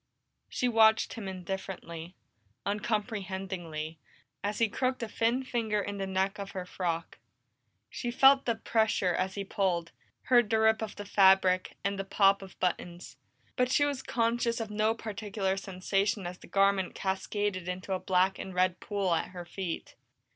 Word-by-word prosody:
She 250 Hz, -, 0 dB
watched 220 Hz, -2 st, +4 dB
him 220 Hz, -4 st, -6 dB
indifferently, 185 Hz, -2 st, -6 dB, 0.5 s
uncomprehendingly, 190 Hz, -7 st, -3 dB, 0.4 s
as 205 Hz, +1 st, -1 dB
he 230 Hz, -, +3 dB
crooked 255 Hz, +3 st, -1 dB
a -, -, -2 dB
thin 230 Hz, +4 st, +1 dB
finger 225 Hz, -4 st, -1 dB
in 205 Hz, 0 st, -4 dB
the 195 Hz, -, -2 dB
neck 190 Hz, +2 st, 0 dB
of 200 Hz, 0 st, -6 dB
her 185 Hz, -1 st, -4 dB
frock. 170 Hz, -2 st, -3 dB, 0.7 s
She 240 Hz, -, -4 dB
felt 270 Hz, +2 st, +6 dB
the 235 Hz, -, +1 dB
pressure 220 Hz, -5 st, +1 dB
as 190 Hz, +2 st, -1 dB
he 200 Hz, -, -2 dB
pulled, 180 Hz, -4 st, -1 dB, 0.3 s
heard 240 Hz, -4 st, +4 dB
the 220 Hz, -, +3 dB
rip 220 Hz, 0 st, +4 dB
of 220 Hz, -2 st, -4 dB
the 205 Hz, -, -7 dB
fabric, 190 Hz, -2 st, +4 dB
and 200 Hz, 0 st, -1 dB
the -, -, -1 dB
pop 195 Hz, 0 st, +3 dB
of 190 Hz, -1 st, -12 dB
buttons, 175 Hz, -1 st, -3 dB, 0.4 s
but 250 Hz, 0 st, +2 dB
she 290 Hz, -, +4 dB
was 285 Hz, -2 st, -2 dB
conscious 235 Hz, 0 st, 0 dB
of 220 Hz, -2 st, -4 dB
no 215 Hz, +1 st, +1 dB
particular 205 Hz, -3 st, -2 dB
sensation 195 Hz, +1 st, -1 dB
as 180 Hz, +1 st, -6 dB
the -, -, -14 dB
garment 195 Hz, -1 st, +2 dB
cascaded 190 Hz, -1 st, -2 dB
into 185 Hz, +2 st, -3 dB
a 185 Hz, -, -1 dB
black 185 Hz, +1 st, +2 dB
and 190 Hz, -1 st, -6 dB
red 185 Hz, 0 st, +2 dB
pool 200 Hz, -4 st, -1 dB
at 165 Hz, -, 0 dB
her 180 Hz, -1 st, -8 dB
feet. 175 Hz, -1 st, -5 dB
195 Hz, 165 wpm, -30 LUFS, 185-220 Hz, 0.7 s, felt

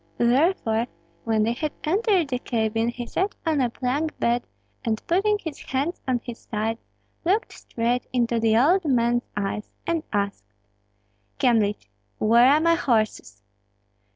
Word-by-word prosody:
Therefore, 240 Hz, -3 st, +2 dB, 0.4 s
when 220 Hz, -2 st, +2 dB
they 230 Hz, +2 st, +1 dB
had 300 Hz, +4 st, -3 dB
entered 370 Hz, -, +2 dB
the 250 Hz, -2 st, -1 dB
cabin 225 Hz, -2 st, 0 dB
he 240 Hz, 0 st, -4 dB
sat 385 Hz, +10 st, -1 dB
on 310 Hz, -4 st, +2 dB
a 245 Hz, -, +2 dB
plank 275 Hz, +6 st, -2 dB
bed, 235 Hz, +1 st, +1 dB, 0.4 s
and 220 Hz, -3 st, 0 dB
putting 405 Hz, +5 st, +2 dB
his 320 Hz, -7 st, -7 dB
hands 280 Hz, +7 st, -2 dB
on 255 Hz, -2 st, +1 dB
his 240 Hz, -2 st, -7 dB
sides, 225 Hz, +1 st, -3 dB, 0.4 s
looked 385 Hz, +6 st, +1 dB
straight 240 Hz, +2 st, -2 dB
into 235 Hz, -2 st, +1 dB
the 225 Hz, -1 st, +3 dB
old 345 Hz, +10 st, +4 dB
man's 240 Hz, -4 st, +1 dB
eyes 205 Hz, +1 st, -3 dB, 0.2 s
and 335 Hz, -1 st, 0 dB
asked, 200 Hz, -1 st, -3 dB, 0.8 s
"Kyemlich, 220 Hz, -6 st, +2 dB, 0.3 s
where 235 Hz, +4 st, +5 dB
are 295 Hz, +2 st, +5 dB
my 335 Hz, +1 st, +4 dB
horses?" 230 Hz, -9 st, -1 dB
245 Hz, 145 wpm, -24 LUFS, 225-315 Hz, 0.8 s, where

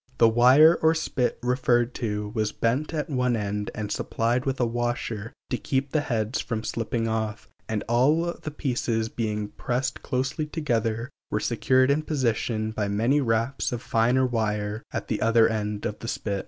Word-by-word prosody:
The 115 Hz, -, +6 dB
wire 130 Hz, +8 st, +6 dB
or 160 Hz, +1 st, +4 dB
spit 135 Hz, -5 st, -1 dB
referred 125 Hz, -1 st, +2 dB
to 105 Hz, -3 st, -3 dB
was 110 Hz, -1 st, -1 dB
bent 130 Hz, +8 st, 0 dB
at 155 Hz, -2 st, -2 dB
one 125 Hz, -5 st, +1 dB
end 105 Hz, -1 st, -2 dB
and 105 Hz, -1 st, -4 dB
supplied 120 Hz, +3 st, -1 dB
with 135 Hz, 0 st, -1 dB
a 125 Hz, -, +3 dB
washer 120 Hz, -2 st, -2 dB, 0.2 s
to -, -, +1 dB
keep 135 Hz, 0 st, -1 dB
the 155 Hz, -, +2 dB
heads 115 Hz, -3 st, -1 dB
from 110 Hz, -3 st, -3 dB
slipping 115 Hz, 0 st, -2 dB
off, 110 Hz, -1 st, -2 dB, 0.2 s
and 110 Hz, -1 st, -1 dB
all 150 Hz, +9 st, +3 dB
the 155 Hz, -, -7 dB
pieces 120 Hz, -6 st, -1 dB
being 105 Hz, -3 st, -2 dB
pressed 125 Hz, +3 st, -2 dB
closely 130 Hz, +3 st, -2 dB
together 120 Hz, -6 st, -1 dB, 0.2 s
were 105 Hz, -, 0 dB
secured 130 Hz, +4 st, +2 dB
in 145 Hz, +2 st, +2 dB
position 115 Hz, -7 st, -1 dB
by 105 Hz, -2 st, -2 dB
many 115 Hz, +8 st, +2 dB
wraps 115 Hz, +2 st, 0 dB
of 120 Hz, 0 st, -4 dB
finer 120 Hz, +3 st, +2 dB
wire 105 Hz, -3 st, -1 dB
at -, -, -4 dB
the 110 Hz, -, -2 dB
other 115 Hz, 0 st, +5 dB
end 105 Hz, -2 st, -2 dB
of 105 Hz, -, -3 dB
the 115 Hz, -, -7 dB
spit. 100 Hz, -4 st, -2 dB
120 Hz, 175 wpm, -26 LUFS, 110-130 Hz, 0.2 s, The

